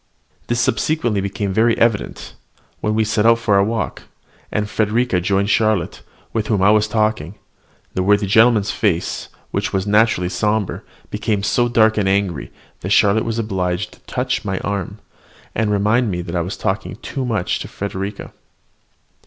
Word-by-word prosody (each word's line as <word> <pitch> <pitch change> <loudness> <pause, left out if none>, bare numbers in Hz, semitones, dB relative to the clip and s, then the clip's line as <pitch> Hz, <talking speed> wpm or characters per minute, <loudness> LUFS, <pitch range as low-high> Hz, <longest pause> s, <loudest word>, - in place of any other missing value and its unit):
This 120 0 0
subsequently 115 -2 +1
became 100 0 -3
very 115 +3 +3
evident, 115 -3 0 0.5
when 105 0 -1
we 110 - +3
set 105 0 +1
out 115 0 +5
to 115 - -13
take 105 - +4
a 100 - +5
walk, 115 +2 -2 0.5
and 105 0 -1
Frederica 110 -1 +1
joining 100 +2 +1
Charlotte, 110 0 +1 0.3
with 110 -2 -1
whom 100 -4 +1
I 100 - +6
was 105 0 +3
talking, 105 -5 -1 0.6
the 95 - -1
worthy 100 +2 +3
gentleman's 110 0 +4
face, 90 -6 -1 0.2
which - - -1
was 95 -1 -1
naturally 105 -2 +3
rather 90 - -3
sombre, 105 -2 0 0.3
became 105 -3 -1
so 120 +4 +2
dark 110 -2 +3
and 95 -2 +1
angry 95 -6 -1 0.3
that 95 - -5
Charlotte 105 +1 +4
was 115 0 -2
obliged 90 -4 -2
to - - -18
touch 130 +1 -1
my 95 -3 -2
arm, 100 -3 -3 0.6
and 110 -1 0
remind 105 +4 +2
me 90 -2 -3
that 85 +1 -6
I 85 - +1
was 90 +6 -4
talking 95 +1 -2
too 135 - -4
much 110 -7 -1
to - - -6
Frederica. 100 0 -5
105 Hz, 170 wpm, -19 LUFS, 95-110 Hz, 0.6 s, I